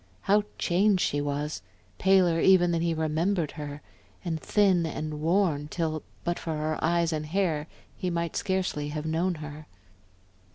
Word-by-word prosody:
How 205 +1 +3
changed 190 +2 +2
she 145 - 0
was! 145 -5 -3 0.4
Paler 185 -3 +4
even 175 -1 +5
than 165 -1 0
he 170 0 +1
remembered 160 +2 0
her, 145 -1 -7 0.4
and 160 -3 -2
thin 195 -5 +3
and 155 -1 -4
worn 165 -3 +1
till, 155 -1 -2 0.2
but 175 0 -1
for 160 -2 -3
her 155 0 -2
eyes 170 0 +2
and 155 -1 -3
hair, 165 -4 0 0.3
he 185 - -2
might 170 -1 -2
scarcely 185 -6 -1
have 150 +1 -4
known 170 +3 0
her. 150 0 -8
165 Hz, 155 wpm, -27 LUFS, 150-180 Hz, 0.4 s, even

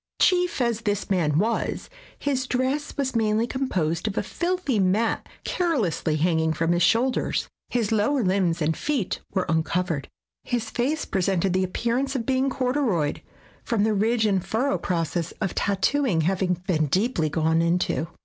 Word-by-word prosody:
Chief 360 -3 +3
as 235 -2 0
this 205 -3 -2
man 155 -6 +2
was, 225 +6 -1 0.3
his 260 -2 -1
dress 260 +4 -1
was 265 -3 -1
mainly 220 0 +2
composed 190 - -1
of 205 - -3
a - - +1
filthy 345 - -1
mat 200 +5 +1
carelessly 235 - 0
hanging 160 0 +1
from 165 +2 0
his 175 0 +2
shoulders. 250 +6 +2 0.2
His 230 -4 0
lower 225 +5 +2
limbs 180 -4 +1
and 160 +1 +1
feet 275 -10 -1 0.2
were 185 - +1
uncovered. 160 -2 -1 0.3
His 230 -3 -2
face 285 +5 -1
presented 190 -1 0
the 185 0 +2
appear 230 +6 -1
ance 275 0 -2
of 235 -3 -2
being 265 +1 +1
corduroyed 250 - 0 0.4
from 225 -5 0
the 220 0 +2
ridge 220 +2 +2
and 195 -4 +1
furrow 260 +8 0
process 170 -1 -2
of 195 -3 -1
tattooing 200 - +1
having 180 +2 +1
been 155 -5 +1
deeply 185 - +1
gone 160 +2 +2
into. 170 -1 0
205 Hz, 160 wpm, -25 LUFS, 175-255 Hz, 0.4 s, Chief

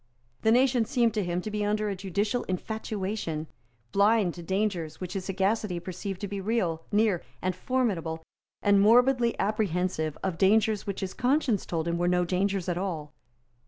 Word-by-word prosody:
The 220 - +3
nation 250 0 +4
seemed 235 -1 +1
to 210 -2 0
him 175 0 -1
to 215 - -5
be 210 0 -1
under 210 +1 0
a 200 - -2
judicial 200 +5 -1
infatuation, 190 -4 -3 0.5
blind 200 -2 +3
to 175 - -9
dangers 180 -3 -2
which 180 -1 -5
his 190 -2 -4
sagacity 195 -1 0
perceived 185 +2 -5
to 205 - -2
be 200 0 -4
real, 190 -6 0
near 210 -4 +2 0.2
and 185 -1 -1
formidable, 185 -9 -1 0.4
and 200 -1 +5
morbidly 240 +2 +4
apprehensive 180 -6 0
of 170 -4 -2
dangers 215 +1 +3
which 200 - -3
his 190 -1 -3
conscience 250 - +1
told 165 -1 -2
him 170 0 -1
were 175 - +1
no 180 0 +2
dangers 190 +1 0
at 175 -1 -1
all. 160 -6 -4
195 Hz, 170 wpm, -28 LUFS, 180-215 Hz, 0.5 s, and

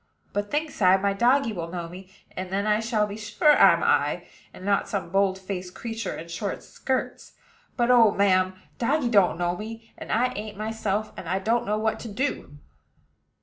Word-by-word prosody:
But, 205 0 -2
thinks 300 -4 -3
I, 185 0 +6
my 200 +1 0
doggy 245 +3 +2
will 170 -4 -4
know 170 0 -5
me; 185 +2 -11 0.3
and 185 0 -5
then 195 +2 -1
I 210 0 +2
shall 220 -2 +1
be 205 0 -7
sure 215 +8 +3
I'm - - +6
I, - - +1 0.3
and 185 - -11
not 200 0 +1
some 185 -5 -3
boldfaced 190 -1 -1
creature 225 -3 -5
in 165 - -8
short 190 +4 -4
skirts. 260 -1 -4 0.4
But, 240 0 +3
oh, 235 -3 +7
ma'am! 185 -2 +2 0.2
doggy 265 +1 +1
don't 200 -7 +4
know 175 0 0
me; 225 +3 -9
and - - -7
I 245 +3 +2
ain't 210 -1 -6
myself, 215 -1 -2
and 170 - -7
I 185 - +1
don't 225 +4 0
know 210 +1 +1
what 220 0 -1
to - - -7
do." 215 - -3
205 Hz, 190 wpm, -25 LUFS, 190-225 Hz, 0.4 s, oh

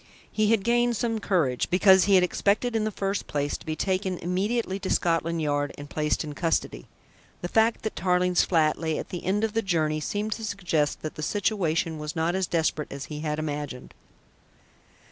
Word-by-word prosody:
He 215 -1 +1
had 220 -3 +3
gained 240 +1 +2
some 230 -1 -1
courage, 165 -12 0
because 190 +1 +6
he 200 -1 +4
had 185 - +6
expected 210 +6 +1
in 215 -1 +1
the 215 - -1
first 195 0 -2
place 145 0 -1
to - - -10
be 155 - -1
taken 190 +1 -1
immediately 195 +4 -1
to 190 - -4
Scotland 165 -1 +1
Yard 145 -1 -1
and 145 0 -10
placed 150 0 0
in 150 -1 -6
custody. 160 - -1 0.6
The - - -1
fact 225 +4 +2
that 220 - -3
Tarling's 180 0 +2
flat 160 -4 +2
lay 160 -2 -1
at - - -6
the 175 - -6
end 200 +4 0
of 220 -1 0
the 225 - +1
journey 160 -6 0
seemed 205 +7 -3
to 225 - -3
suggest 175 -8 -1
that 155 - -4
the - - -8
situation 165 -3 0
was 150 0 -5
not 165 +1 0
as 190 -1 0
desperate 160 -2 -1
as 140 0 -6
he 150 - -5
had 150 -1 -2
imagined. 145 -4 -5
180 Hz, 200 wpm, -26 LUFS, 155-205 Hz, 0.6 s, because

